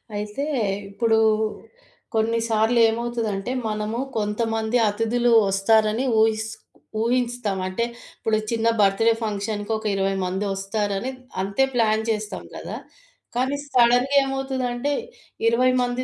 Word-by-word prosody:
అయితే 210 +6 -3 0.5
ఇప్పుడు 225 +2 +1 1.0
కొన్నిసార్లు 225 +1 +2
ఏమవుతదంటే 230 -2 -2 0.2
మనము 215 +2 -2 0.2
కొంతమంది 220 +2 0
అతిధులు 225 +3 +1 0.2
ఒస్తారని 215 +4 +3 0.2
ఊహిస్ 220 0 +2 0.5
ఊహిస్తాం. 240 -3 0
అంటే 185 +5 -1 0.3
ఇప్పుడు 220 -1 +1
చిన్న 230 0 +1
బర్త్ 195 +2 +3
డే - - +7
ఫంక్షన్‌కి 205 0 -3
ఒక 220 - -10
20 195 0 +1
మంది 190 +3 -2
ఒస్తారని 200 +3 -2 0.3
అంతే 200 +7 +1
ప్లాన్ 220 -2 +2
చేస్తాం 215 -1 -3
గదా! - - -6 0.6
కానీ 260 +3 +1 0.2
సడన్‌గా 245 +2 +4
ఏమవుతదంటే 265 -1 -2 0.6
20 250 +3 +4
మంది 245 +1 -1
225 Hz, 110 wpm, -23 LUFS, 210-240 Hz, 1.0 s, డే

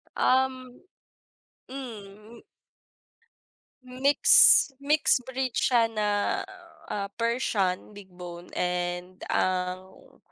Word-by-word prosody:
Um, 255 -1 -3 0.9
mm. 220 -4 -13 1.4
Mix 265 +3 +6
mix 295 -2 +2
breed 260 0 -7
siya 240 -3 -1
na, 215 -2 -5 0.8
ah, 200 -1 -6
Persian 215 -5 -4
big 200 -2 -16
bone 175 -1 -13
and 180 +1 -6
ang, 185 0 -6
215 Hz, 75 wpm, -23 LUFS, 185-255 Hz, 1.4 s, Mix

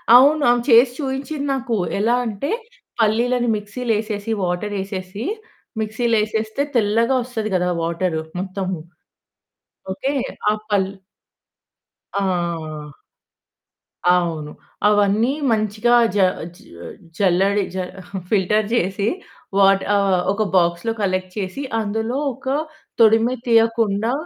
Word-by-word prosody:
అవును. 290 +4 +6
ఆమె 240 0 +3
చేసి 240 +1 +7
చూయించింది 280 +1 -3
నాకు. 255 -3 -2 0.2
ఎలా 230 +4 +3
అంటే 225 +5 -3 0.5
పల్లీలని 240 +3 +2
మిక్సీలేసేసి 215 0 -3
వాటరేసేసి 190 +2 -3 0.6
మిక్సీలో 225 +2 0
ఏసేస్తే 220 +3 -2
తెల్లగా 230 +3 +2
ఒస్తది 225 -3 -4
కదా! 180 0 +1
వాటరు 170 0 -1 0.2
మొత్తము. 190 -1 -3 1.2
ఓకే. 265 +9 -2 0.4
ఆ! - - +3 0.2
పల్ 190 -2 +2 1.3
ఆ! 170 -6 -2 1.2
అవును. 165 -4 +1 0.4
అవన్నీ 210 +4 +3 0.2
మంచిగా 215 +2 +2 0.2
జ - - +1 0.4
జ - - -18 0.6
జల్లడి 195 +1 +2
జ - - -3 0.5
ఫిల్టర్ 210 +1 +2
జేసి 200 -2 0 0.5
వాట 195 0 +5
ఆహ్, 195 -2 +2
ఒక 215 +2 0
బాక్స్‌లో 175 +4 +2
కలెక్ట్ 185 -1 -1
చేసి 190 +7 -4 0.2
అందులో 220 +4 -2 0.2
ఒక 265 - -18 0.5
తొడిమ 225 0 +5 0.2
తీయకుండా 225 -1 +2
210 Hz, 100 wpm, -21 LUFS, 190-230 Hz, 1.3 s, చేసి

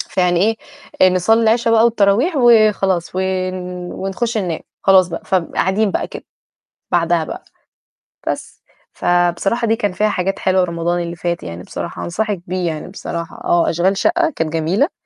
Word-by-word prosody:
فيعني 185 +4 +1 0.4
إيه 185 - +7
نصلِّي 220 +6 +3
العشا 230 +1 +2
بقى 225 0 +5
والتراويح 230 - +2
وخلاص، 215 -8 +3
ون 185 0 -1 0.4
ونخش 220 +4 -2
ننام 175 -5 -2 0.2
خلاص 190 -2 +5
بقى، 170 - -6
فقاعدين 190 +3 0
بقى - - -2
كده - - -9 0.7
بعدها 170 -1 +2
بقى، - - -7 0.8
بس، - - -5 0.3
فبصراحة 175 +6 +1
دي 225 - +3
كان 205 -3 -1
فيها 210 +3 +1
حاجات 195 0 -2
حلوة 185 -1 +2
رمضان 170 0 -1
اللي 170 0 -5
فات 170 +1 -3
يعني 85 +1 -7
بصراحة - - -6
أنصحِك 200 +1 -2
بيه 180 -1 -2
يعني 155 -2 -4
بصراحة 170 -3 -6
آه، 170 -1 +2
أشغال 185 +4 +1
شقة 345 -1 +2
كانت 160 -1 -2
جميلة. 180 - +1
185 Hz, 150 wpm, -18 LUFS, 175-215 Hz, 0.8 s, إيه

